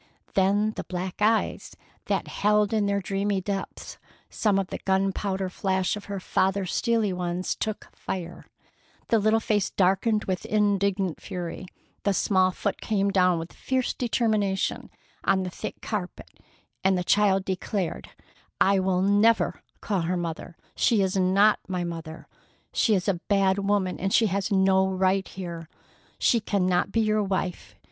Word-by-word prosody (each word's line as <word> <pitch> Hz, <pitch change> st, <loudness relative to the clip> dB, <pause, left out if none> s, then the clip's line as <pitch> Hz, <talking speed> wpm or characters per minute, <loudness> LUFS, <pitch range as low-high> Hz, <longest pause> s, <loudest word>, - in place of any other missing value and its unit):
Then 200 Hz, +3 st, +2 dB
the -, -, -6 dB
black 185 Hz, +2 st, -5 dB
eyes 220 Hz, +1 st, +1 dB, 0.3 s
that -, -, -1 dB
held 210 Hz, 0 st, +2 dB
in 210 Hz, -2 st, +2 dB
their 200 Hz, 0 st, 0 dB
dreamy 195 Hz, +1 st, -1 dB
depths 195 Hz, +1 st, -5 dB, 0.3 s
some 210 Hz, -3 st, +1 dB
of 195 Hz, -2 st, -1 dB
the -, -, -5 dB
gunpowder 190 Hz, 0 st, 0 dB
flash 190 Hz, +1 st, -1 dB
of 210 Hz, -, -8 dB
her 200 Hz, -1 st, -4 dB
father's 190 Hz, 0 st, 0 dB
steely 225 Hz, -4 st, +1 dB
ones 180 Hz, 0 st, -2 dB
took 215 Hz, -1 st, -4 dB
fire; 175 Hz, -2 st, -6 dB, 0.6 s
the 225 Hz, -, +4 dB
little 215 Hz, +2 st, +3 dB
face 210 Hz, -3 st, 0 dB
darkened 205 Hz, +4 st, +2 dB
with 185 Hz, -1 st, -2 dB
indignant 200 Hz, -3 st, +1 dB
fury; 180 Hz, +1 st, -6 dB, 0.3 s
the 200 Hz, -1 st, +1 dB
small 185 Hz, -1 st, +3 dB
foot 200 Hz, +2 st, -3 dB
came 200 Hz, -2 st, 0 dB
down 180 Hz, -2 st, +3 dB
with 165 Hz, +1 st, -6 dB
fierce 260 Hz, -1 st, -1 dB
determination 215 Hz, -5 st, 0 dB, 0.3 s
on 190 Hz, -1 st, +2 dB
the 180 Hz, -, -4 dB
thick 215 Hz, -, -7 dB
carpet, 200 Hz, -5 st, -5 dB, 0.5 s
and 190 Hz, 0 st, +3 dB
the 180 Hz, -, -1 dB
child 195 Hz, 0 st, +3 dB
declared: 185 Hz, -2 st, -3 dB, 0.5 s
"I 195 Hz, 0 st, +4 dB
will 185 Hz, -1 st, +1 dB
never 205 Hz, +3 st, +3 dB, 0.2 s
call 200 Hz, -4 st, -1 dB
her 175 Hz, +2 st, -1 dB
mother! 170 Hz, 0 st, -5 dB, 0.2 s
She 220 Hz, -5 st, +3 dB
is 190 Hz, 0 st, -1 dB
not 195 Hz, +3 st, +4 dB
my 180 Hz, -2 st, -2 dB
mother! 165 Hz, -2 st, -7 dB, 0.5 s
She 220 Hz, -, +3 dB
is 185 Hz, 0 st, -1 dB
a 180 Hz, -4 st, 0 dB
bad 195 Hz, -1 st, +3 dB
woman, 195 Hz, -2 st, 0 dB
and 195 Hz, +1 st, -1 dB
she 225 Hz, -, +4 dB
has 200 Hz, 0 st, -1 dB
no 190 Hz, -1 st, +4 dB
right 190 Hz, 0 st, +1 dB
here. 170 Hz, -3 st, -7 dB, 0.5 s
She 235 Hz, -, +3 dB
cannot 185 Hz, -3 st, 0 dB
be 225 Hz, -, +2 dB
your 215 Hz, 0 st, +2 dB
wife. 190 Hz, -2 st, -3 dB
195 Hz, 155 wpm, -26 LUFS, 185-205 Hz, 0.6 s, the